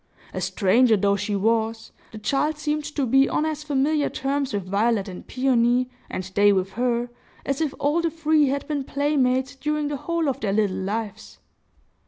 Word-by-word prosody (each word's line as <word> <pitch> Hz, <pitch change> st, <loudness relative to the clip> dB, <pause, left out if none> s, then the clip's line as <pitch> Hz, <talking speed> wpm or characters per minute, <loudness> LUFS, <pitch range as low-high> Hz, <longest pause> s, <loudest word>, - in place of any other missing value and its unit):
A -, -, -3 dB
stranger 225 Hz, +3 st, +3 dB
though 200 Hz, +1 st, +2 dB
she 205 Hz, +1 st, -2 dB
was, 225 Hz, +2 st, 0 dB, 0.2 s
the 220 Hz, -, -9 dB
child 280 Hz, +8 st, 0 dB
seemed 300 Hz, 0 st, -2 dB
to 295 Hz, -2 st, -2 dB
be 270 Hz, +3 st, +4 dB
on 305 Hz, -, 0 dB
as 310 Hz, -1 st, -3 dB
familiar 290 Hz, +1 st, +1 dB
terms 275 Hz, 0 st, -2 dB
with 200 Hz, -2 st, -2 dB
Violet 205 Hz, +2 st, +1 dB
and 185 Hz, -2 st, -9 dB
Peony, 250 Hz, -1 st, +2 dB, 0.2 s
and 185 Hz, -, -4 dB
they 205 Hz, +1 st, +5 dB
with 190 Hz, -1 st, 0 dB
her, 240 Hz, 0 st, -1 dB, 0.3 s
as 275 Hz, +2 st, -1 dB
if 310 Hz, -3 st, -1 dB
all 295 Hz, +4 st, +1 dB
the 335 Hz, -, 0 dB
three 310 Hz, -2 st, +2 dB
had 280 Hz, +1 st, -2 dB
been 290 Hz, -3 st, -2 dB
playmates 265 Hz, -2 st, 0 dB
during 300 Hz, +1 st, -2 dB
the 290 Hz, -, -3 dB
whole 335 Hz, +2 st, -1 dB
of 270 Hz, -1 st, -1 dB
their 205 Hz, -6 st, -1 dB
little 205 Hz, -2 st, +1 dB
lives. 205 Hz, +2 st, -5 dB
260 Hz, 185 wpm, -24 LUFS, 215-295 Hz, 0.3 s, they